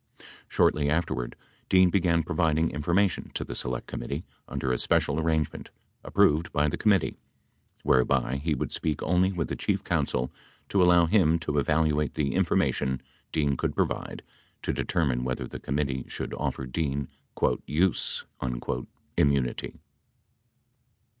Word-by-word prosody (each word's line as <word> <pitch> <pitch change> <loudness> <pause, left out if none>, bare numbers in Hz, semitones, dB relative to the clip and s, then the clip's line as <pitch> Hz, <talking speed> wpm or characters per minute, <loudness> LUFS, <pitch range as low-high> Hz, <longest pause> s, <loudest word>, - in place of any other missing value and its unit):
72 - - -18 0.3
Shortly 70 -1 +3
afterward, 75 -6 -1 0.3
Dean 95 -1 +5
began 85 -3 +2
providing 80 0 +1
information 85 +6 +1
to - - -1
the - - -6
Select 60 0 -3
Committee 70 +7 -5 0.2
imder 65 -1 -1
a 60 - -1
special 75 +2 +2
arrangement, 80 -2 -1 0.3
approved 80 +3 +3
by 75 +1 +2
the 75 - -1
committee, 100 -6 +2 0.7
whereby 65 +1 +2
he 75 +2 -1
would - - -3
speak 75 -2 -2
only 90 +3 +3
with 85 -4 -2
the - - -3
chief - - -1
counsel 60 +1 0 0.4
to 100 - +3
allow 90 -1 +6
him 85 -3 +4
to 75 -3 -1
evaluate 75 0 +1
the 70 -3 0
information 65 0 +1 0.3
Dean 75 -3 +1
could - - -2
provide - - -2 0.4
to - - -1
determine 65 -7 0
whether 65 0 -2
the - - -8
committee 70 -1 -2
should - - -5
offer 65 - -3
Dean 70 0 -2 0.6
"use" 85 +6 +1 0.9
immunity. 70 -4 +1
75 Hz, 135 wpm, -27 LUFS, 70-85 Hz, 0.9 s, allow